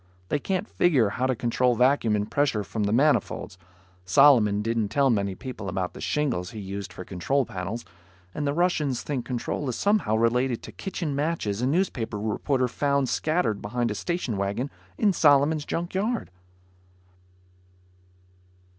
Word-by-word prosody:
They 145 - +1
can't 190 +7 -2
figure 135 - +3
how 125 +5 -1
to 130 - +1
control 120 +1 +1
vacuum 125 -3 +3
and 105 0 -2
pressure 135 -8 +1
from 105 +1 -3
the 100 - 0
manifolds. 130 -7 +1 0.4
Solomon 105 -1 +5
didn't 115 -1 0
tell 135 +4 +3
many 100 -3 0
people 110 -6 -6
about 90 0 -2
the - - -10
shingles 125 - -1
he 110 - -8
uses 100 0 -5
for 90 - -10
control 130 +10 0
panels, 105 +1 -5 0.5
and 145 -1 -2
the - - +2
Russians 150 -5 0
think 135 -5 -3
control 130 +2 -3
is 120 - -2
somehow 200 - +2
related 120 +2 +1
to - - -8
kitchen 175 -6 -4
matches 140 -9 -1
a 125 - +1
newspaper 130 - -1
reporter 125 +5 0
found 140 +1 0
scattered 155 - 0
behind 120 +2 -1
a - - -1
station 130 - -2
wagon 100 +8 -2 0.3
in 205 -3 +3
Solomon's 150 -1 +4
junk 170 +1 -3
yard. 215 - -1
125 Hz, 155 wpm, -26 LUFS, 105-145 Hz, 0.5 s, Solomon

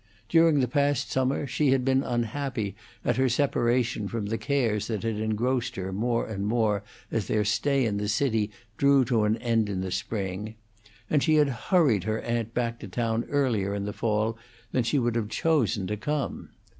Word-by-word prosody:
During 165 -4 +5
the 125 - +1
past 140 +1 +1
summer 130 +2 0
she 140 +2 +1
had 130 -1 +2
been 135 0 +3
unhappy 120 -3 -2 0.3
at - - +1
her 130 0 +3
separation 120 -4 +1
from 110 0 -3
the 110 +2 -2
cares 115 -7 0
that 110 -2 -3
had 115 -2 -1
engrossed 120 +3 -1
her 95 0 -4
more 115 +4 0
and 100 -2 -3
more 110 -3 +1 0.3
as 110 -5 -1
their 105 -1 +1
stay 130 +6 +2
in 105 -3 0
the 105 0 -2
city 110 -1 +1 0.3
drew 140 -2 +4
to 115 -3 +2
an 105 +2 +2
end 115 -3 +1
in 95 -2 -2
the 95 -1 -4
spring, 100 +2 -3 0.5
and 150 - +2
she 155 +1 +3
had 150 -2 +4
hurried 125 - +2
her 110 0 -1
aunt 115 -1 -3
back 115 -1 -1
to 105 - -8
town 115 +3 -1
earlier 115 -9 +1
in 100 0 -3
the 105 - -4
fall 110 +1 0 0.3
than 130 - +2
she 130 +5 +1
would 120 -3 +1
have 110 -3 -1
chosen 120 - +1
to 105 - -2
come. 150 +5 -3
115 Hz, 195 wpm, -27 LUFS, 105-130 Hz, 0.5 s, During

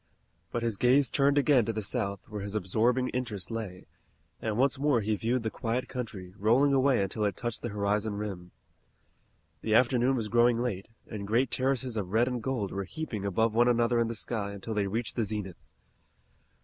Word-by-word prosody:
But 120 - -2
his 115 -3 -1
gaze 130 +4 +4
turned 140 0 +3
again 140 -3 +5
to 115 - 0
the 110 0 -3
South, 100 -3 -3
where 105 -1 -6
his 100 +1 -5
absorbing 115 +6 +1
interest 115 -6 -4
lay, 105 -5 -5 0.6
and 110 -1 -2
once 135 +1 +2
more 140 -5 +2
he 105 +1 0
viewed 115 +4 -1
the 110 - -2
quiet 120 +2 -2
country, 100 -8 -6
rolling 125 +7 +4
away 135 -5 +3
until 100 +3 -2
it 100 -3 0
touched 120 -1 -3
the 120 - -3
horizon 105 +1 -1
rim. 100 -4 -5 1.1
The 110 -1 +1
afternoon 125 +2 +3
was 115 -4 -2
growing 120 +1 +3
late, 110 -6 -2 0.2
and 100 -2 -6
great 120 +4 +2
terraces 130 -2 0
of 95 -3 -3
red 115 +2 +4
and 125 -2 -2
gold 110 -5 -2
were 100 0 -3
heaping 115 - -5
above 110 +3 +1
one 120 +2 +4
another 120 0 +3
in 115 - +2
the 115 - -4
sky 105 -2 -3
until 100 +3 -5
they 105 -2 0
reached 115 +4 -2
the 115 - +2
zenith. 105 -4 -5
115 Hz, 195 wpm, -29 LUFS, 105-125 Hz, 1.1 s, again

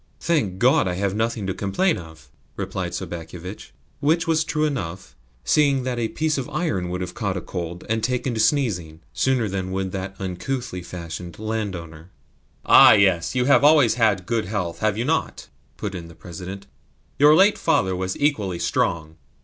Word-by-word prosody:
"Thank 140 - 0
God, 120 -2 +4
I 90 - -1
have 100 +1 -1
nothing 110 -1 -1
to 95 - -1
complain 100 - 0
of," 80 -2 -13 0.3
replied - - -4
Sobakevitch: 85 +3 -7 0.3
which 160 +3 +2
was 160 -1 +2
true 155 -1 0
enough, 95 - -4 0.3
seeing 140 - +3
that 125 -1 -2
a 115 - 0
piece 155 +3 -1
of 135 - -5
iron 145 - -2
would 90 +1 -3
have 90 -1 -5
caught 100 -5 -3
cold 85 -1 -5
and 110 0 -1
taken 125 +1 -1
to 110 - -3
sneezing 95 - 0
sooner 130 -4 +1
than 95 -1 -3
would 95 0 -2
that 95 +1 -5
uncouthly 95 +2 -4
fashioned 85 -1 -8
landowner. 95 -7 -5 0.6
"Ah, - - +9
yes; 95 -1 +2
you 125 -1 +2
have 140 +1 +5
always 145 -5 +6
had 110 -6 +1
good 115 0 -1
health, 90 -4 -3
have 110 -1 0
you 115 - -1
not?" 160 +3 -2 0.3
put 100 -2 -4
in 85 -3 -7
the 85 - -14
President. 95 +3 -8 0.5
"Your 150 +2 +7
late 195 +5 +5
father 140 - +1
was 95 0 -3
equally 110 - 0
strong." 80 -1 -1
100 Hz, 175 wpm, -23 LUFS, 90-130 Hz, 0.6 s, Ah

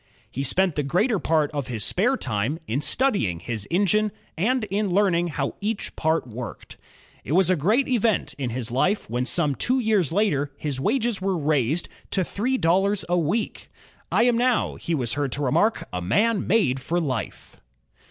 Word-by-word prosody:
He 135 - -4
spent 180 +6 +2
the 150 - -1
greater 190 - +1
part 155 -3 +1
of 145 -3 -3
his 115 -5 -3
spare 245 - +2
time 110 - -2
in 130 +3 -2
studying 200 - 0
his 110 +2 -5
engine 205 +4 +2 0.2
and 240 +8 +1
in 205 0 0
learning 180 -2 +2
how 145 -4 -2
each 210 +1 -3
part 160 -2 0
worked. 120 -1 -8 0.5
It 145 - -3
was 185 0 +4
a - - +4
great 210 - +2
event 230 -6 +1
in 130 -3 -2
his 120 -1 -4
Ufe 185 - +1
when 125 +1 0
some 150 +1 +1
two 250 - +1
years 215 - +1
later 165 -8 +1
his 145 -4 -3
wages 230 - 0
were 190 -1 0
raised 150 0 0 0.2
to 190 - +1
three 245 +9 -1
dollars 195 +2 +2
a 175 - +2
week. 175 +8 -2 0.4
"I - - +4
am 240 -1 +3
now," 250 -1 +2
he 165 - -3
was 125 -5 0
heard 145 -2 -1
to 145 - -3
remark, 210 - +1
"a 90 - -2
made 210 - +2
man 190 - +2
for 165 +7 -1
life." 130 - -5
170 Hz, 180 wpm, -24 LUFS, 135-210 Hz, 0.5 s, was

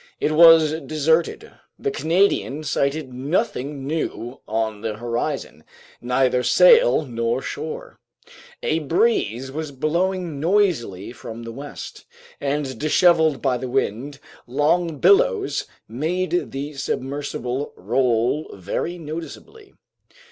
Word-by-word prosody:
It 150 - +1
was 160 -1 +6
deserted. 160 +2 0 0.3
The 420 - -2
Canadian 165 - +1
sighted 140 -1 -1
nothing 140 - -2
new 140 -4 -4
on 110 -1 -2
the 110 -1 -3
horizon, 120 - -3 0.4
neither 125 +1 +2
sail - - +5
nor 115 0 -2
shore. 155 +2 -6 0.6
A 155 - +1
breeze 135 - 0
was 155 +1 -5
blowing 170 +3 -1
noisily 155 - 0
from 115 -1 -9
the 115 - -7
west, 140 +4 -9 0.3
and 140 -1 -2
disheveled 160 -1 +3
by 130 -3 +2
the 130 - -5
wind, 135 +2 -2 0.3
long 155 +5 +1
billows 440 - +3 0.2
made 175 +8 -1
the 140 +2 -5
submersible 135 -1 -3
roll 120 +6 0
very 100 - -3
noticeably. 170 - -9
145 Hz, 105 wpm, -22 LUFS, 125-165 Hz, 0.6 s, was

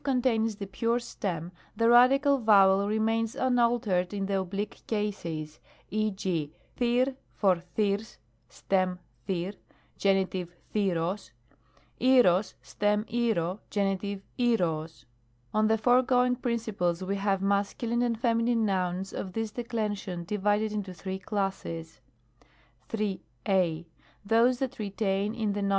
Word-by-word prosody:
contains 240 -5 +1
the 200 -1 -6
pure 230 +5 0
stem, 180 -8 -4 0.2
the 230 +2 +2
radical 270 +4 +6
vowel 200 -3 +5
remains 225 +1 0
unaltered 235 -7 +1
in 195 -1 -1
the 195 0 0
oblique 195 +2 -4
cases, 170 -8 -3 0.3
e. 215 0 +1
g. 175 -7 -2 0.3
&riQ 250 +2 +2 0.2
for 185 -4 +2 0.2
&r^Qg 210 0 0 0.3
(stem 185 +6 0 0.3
i9j]^)y 185 +2 -2 0.4
Gen. 195 -1 +3 0.5
&riQ 195 -5 +1
og; 180 +5 -1 0.8
iiQcog 240 -7 +4
(stem 210 +1 0
TlQ(o)i 220 -6 0
Gen. 195 -2 +1
TjQco 205 +3 -1 0.2
og. 160 - -10 0.6
On 215 0 +3
the 220 0 +3
foregoing 250 +2 +3
principles 220 -8 -1
we 195 +2 -1
have 195 -1 0
Masc. 200 +3 0
and 235 0 0
Fem. 230 -1 +2 0.2
nouns 185 -1 -1
of 185 -2 -5
this 225 0 -2
declension 210 -7 -3
divided 210 +3 0
into 200 -3 -4
three 190 +1 -5
classes: 190 -7 -4 0.9
3. 210 -4 -2 0.2
I. 170 -4 +1 0.4
Those 230 +4 +4
that 260 -2 -4
retain 200 0 -1
in 215 -3 -1
the 205 - -2
Nom. 200 - 0
205 Hz, 125 wpm, -28 LUFS, 190-230 Hz, 0.9 s, radical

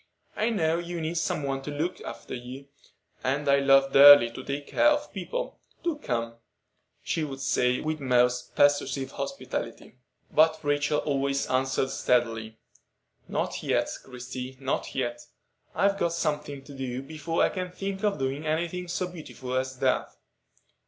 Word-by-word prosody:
I 220 - +1
know 165 -7 +1
you 175 0 -5
need 160 +1 -1
some 155 - -1
one 135 -1 -2
to 135 - -6
look 160 +5 -3
after - - -8
you, 130 +3 -8 0.5
and 140 +3 0
I 140 0 +5
love 135 0 +4
dearly 140 -4 +10
to 130 +2 -8
take 140 +2 -4
care 300 - +3
of 295 0 +1
people. 480 - -4 0.2
Do 340 -3 0
come," 115 - -3 0.7
she 160 - -1
would 135 -3 -5
say, 125 -2 +1
with 155 0 -2
most 125 -2 +1
persuasive 145 -1 +2
hospitality. 125 - -5 0.3
But 160 +1 +4
Rachel 145 0 +1
always 140 -1 0
answered 130 +1 +1
steadily: 115 -2 0 0.7
"Not - - -2
yet, - - 0
Christie, 125 0 -7
not 135 0 -2
yet. 120 -2 -2 0.5
I've 200 0 +2
got 170 -2 +1
something 150 -4 -2
to 140 - -12
do 130 -1 -4
before 160 +3 -1
I - - +4
can 185 -1 -4
think 195 +1 -5
of 205 -6 +1
doing 135 +2 -2
any 160 +2 0
thing 180 +1 -5
so 175 +1 -1
beautiful 155 -7 -8
as 130 0 -1
that. - - +1
140 Hz, 160 wpm, -27 LUFS, 130-165 Hz, 0.7 s, dearly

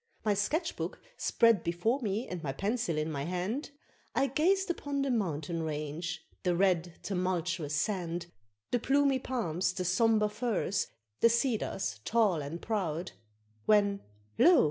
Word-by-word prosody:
My 210 - +4
sketch 310 - 0
book - - -4 0.2
spread 230 -6 +3
before 220 +11 0
me, 215 +1 -1
and 180 -2 -5
my 140 -4 -3
pencil 200 - -1
in 155 +1 -1
my 140 -2 -2
hand, 185 - -2 0.5
I - - +4
gazed 350 +8 +2
upon 285 -4 -2
the 275 - 0
mountain 165 -7 -1
range, 155 +2 -4 0.2
the 180 -1 +1
red 175 -2 +2
tumultuous 175 -5 -1
sand, 175 0 -1 0.5
The 245 - +2
plumy 275 +1 +3
palms, 190 -9 -1
the 185 -1 -3
sombre 215 +4 +3
firs, 210 -3 -1 0.3
the 230 - +6
cedars 225 - 0
tall 210 - +2
and 145 +4 -5
proud, 180 -6 -2 0.6
When 200 -1 +4 0.4
lo! 345 +1 +8
195 Hz, 145 wpm, -31 LUFS, 170-235 Hz, 0.6 s, lo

